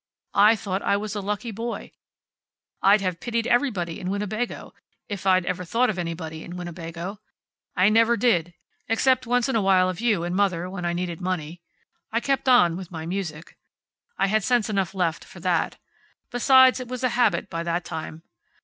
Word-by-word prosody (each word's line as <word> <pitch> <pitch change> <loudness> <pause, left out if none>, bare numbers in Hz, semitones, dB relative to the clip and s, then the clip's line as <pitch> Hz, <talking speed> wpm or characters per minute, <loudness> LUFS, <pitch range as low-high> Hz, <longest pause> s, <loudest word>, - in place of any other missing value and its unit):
I 210 +3 +7
thought 195 -2 -3
I 200 - +2
was 210 0 -4
a 205 - -3
lucky 210 +4 -3
boy. 230 +3 -5 0.9
I'd 200 +1 +5
have 185 -3 -2
pitied 230 -1 -2
everybody 210 - 0
in 180 - -4
Winnebago, 210 +4 -3 0.3
if 200 -3 -5
I'd 185 -1 +4
ever 180 0 -2
thought 230 +7 +1
of 185 - -6
anybody 165 -2 -5
in 175 +1 -8
Winnebago. 175 +2 -6 0.6
I 185 +1 +4
never 230 +2 +4
did, 175 -9 +1 0.3
except 255 +2 +2
once 245 0 +2
in 265 - -1
a 225 - +3
while 185 -1 +4
of 185 +3 -5
you 215 -8 +2
and 175 +1 -2
mother 185 -3 +1
when 180 -2 -5
I 170 - 0
needed 175 0 -4
money. 175 -2 -3 0.5
I 230 - +1
kept 270 +1 0
on 175 -10 +5
with 185 -2 -8
my 160 -3 -6
music. 170 -3 -5 0.6
I - - +2
had 215 +1 +1
sense 235 -2 +1
enough 195 -2 -1
left, 170 -3 -1
for - - -13
that. - - 0 0.5
Besides, 260 +1 +5
it 255 - -6
was 255 +1 -5
a 255 - +3
habit, 240 -3 +1
by 165 -3 -4
that 170 +1 -2
time. 160 0 -6
195 Hz, 185 wpm, -24 LUFS, 175-230 Hz, 0.9 s, I